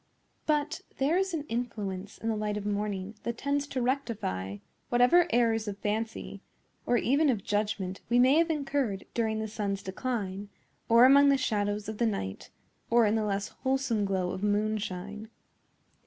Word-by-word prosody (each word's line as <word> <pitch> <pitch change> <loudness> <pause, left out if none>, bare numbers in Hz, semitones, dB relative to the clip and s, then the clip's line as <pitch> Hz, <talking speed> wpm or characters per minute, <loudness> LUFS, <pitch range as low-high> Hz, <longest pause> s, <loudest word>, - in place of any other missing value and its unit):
But 305 +1 0 0.2
there 280 +5 +2
is 380 +1 +1
an 320 -4 -2
influence 210 -7 -4
in 225 - -6
the 225 - +1
light 210 -1 -2
of 205 - -5
morning 205 -1 -2
that 235 0 -3
tends 285 +2 -1
to 260 -3 -2
rectify 210 - -2 0.3
whatever 250 +9 +5
errors 225 -4 +2
of 200 -1 -4
fancy, 215 -1 -3 0.5
or 245 - +3
even 285 +6 +3
of 225 -6 0
judgment, 205 -3 -2
we 240 - +3
may 260 +4 +6
have 335 0 +2
incurred 275 -9 -1
during 220 -2 0
the 220 0 -2
sun's 200 -2 -3
decline, 200 -1 -3 0.4
or 230 +2 +8
among 280 +2 +7
the 275 - +4
shadows 205 -4 -1
of 215 -1 -6
the 235 - +3
night, 95 - -4 0.4
or 235 0 +5
in 210 - +2
the 220 -1 +1
less 200 -1 -1
wholesome 265 -5 +1
glow 185 -2 -1
of 185 - -5
moonshine. 210 0 -2
220 Hz, 170 wpm, -29 LUFS, 205-260 Hz, 0.5 s, or